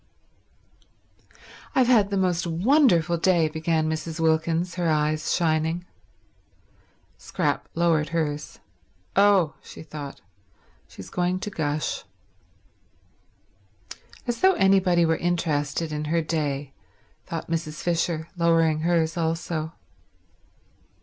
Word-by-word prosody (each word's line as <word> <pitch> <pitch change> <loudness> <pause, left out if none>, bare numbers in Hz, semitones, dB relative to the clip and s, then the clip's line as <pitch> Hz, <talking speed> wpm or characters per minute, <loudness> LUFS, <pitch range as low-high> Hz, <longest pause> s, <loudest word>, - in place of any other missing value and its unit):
"I've 260 - +5
had 225 -5 +4
the 200 - -1
most 180 -1 0
wonderful 175 - +3
day," 170 -2 +3
began 160 0 -1
Mrs. 160 +1 -4
Wilkins, 165 +2 +1
her 175 -2 -1
eyes 155 0 0
shining. 160 +1 0 1.3
Scrap - - -2
lowered 165 -3 +2
hers. 150 -3 -3 0.6
"Oh," 195 -6 +4
she - - -11
thought, 150 -2 -8 0.7
"she's 95 - -12
going 180 +1 0
to 210 - -4
gush." 150 -3 -2 2.2
"As 240 -2 -3
though 380 +1 +6
anybody 190 - +3
were 160 0 +1
interested 165 -2 -1
in 150 0 -3
her 165 +2 0
day," 145 -3 -2 0.5
thought 165 -1 -5
Mrs. 155 -2 -3
Fisher, 170 -2 -1
lowering 165 -2 +3
hers 165 0 +1
also. 165 -1 -2
165 Hz, 105 wpm, -25 LUFS, 155-175 Hz, 2.2 s, though